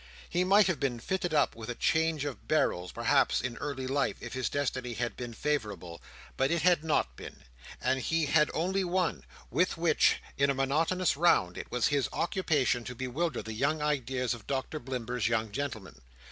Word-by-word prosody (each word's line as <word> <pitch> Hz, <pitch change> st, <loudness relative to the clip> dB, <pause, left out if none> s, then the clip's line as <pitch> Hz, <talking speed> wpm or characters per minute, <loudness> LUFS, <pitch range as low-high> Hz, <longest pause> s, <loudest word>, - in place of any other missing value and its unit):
He 175 Hz, +1 st, +1 dB
might 200 Hz, +3 st, +5 dB
have 185 Hz, -4 st, 0 dB
been 125 Hz, -4 st, -1 dB
fitted 180 Hz, +6 st, -2 dB
up 150 Hz, -2 st, +2 dB
with 115 Hz, 0 st, -8 dB
a 120 Hz, -, -3 dB
change 160 Hz, 0 st, +1 dB
of 140 Hz, -3 st, -6 dB
barrels, 90 Hz, -, +1 dB
perhaps, 120 Hz, +4 st, +2 dB
in 125 Hz, -2 st, -3 dB
early 140 Hz, -3 st, -4 dB
life, 135 Hz, +2 st, 0 dB
if -, -, -7 dB
his 130 Hz, -1 st, -1 dB
destiny 130 Hz, -4 st, -2 dB
had 120 Hz, +2 st, -2 dB
been 120 Hz, -1 st, -6 dB
favourable; 105 Hz, -, -3 dB, 0.4 s
but 135 Hz, +1 st, +2 dB
it 170 Hz, -2 st, 0 dB
had 175 Hz, -3 st, +4 dB
not 145 Hz, -, 0 dB
been; -, -, -10 dB, 0.4 s
and 130 Hz, -, +1 dB
he 160 Hz, +4 st, +1 dB
had 150 Hz, +1 st, +3 dB
only 190 Hz, +4 st, 0 dB
one, 175 Hz, -, 0 dB, 0.3 s
with 170 Hz, +8 st, +1 dB
which, 165 Hz, -2 st, +4 dB, 0.2 s
in 140 Hz, 0 st, +4 dB
a 140 Hz, -, +1 dB
monotonous 160 Hz, +7 st, +1 dB
round, 140 Hz, -, +3 dB
it -, -, -7 dB
was 125 Hz, -1 st, +2 dB
his 145 Hz, -3 st, +1 dB
occupation 150 Hz, -9 st, +1 dB
to 125 Hz, -, -6 dB
bewilder 130 Hz, +4 st, -2 dB
the 110 Hz, -, -6 dB
young 145 Hz, +7 st, 0 dB
ideas 130 Hz, -4 st, 0 dB
of 120 Hz, -3 st, -10 dB
Doctor 140 Hz, +3 st, -2 dB
Blimber's 125 Hz, -3 st, -2 dB
young 110 Hz, -2 st, 0 dB
gentlemen. 110 Hz, -, -5 dB
140 Hz, 190 wpm, -30 LUFS, 120-160 Hz, 0.4 s, might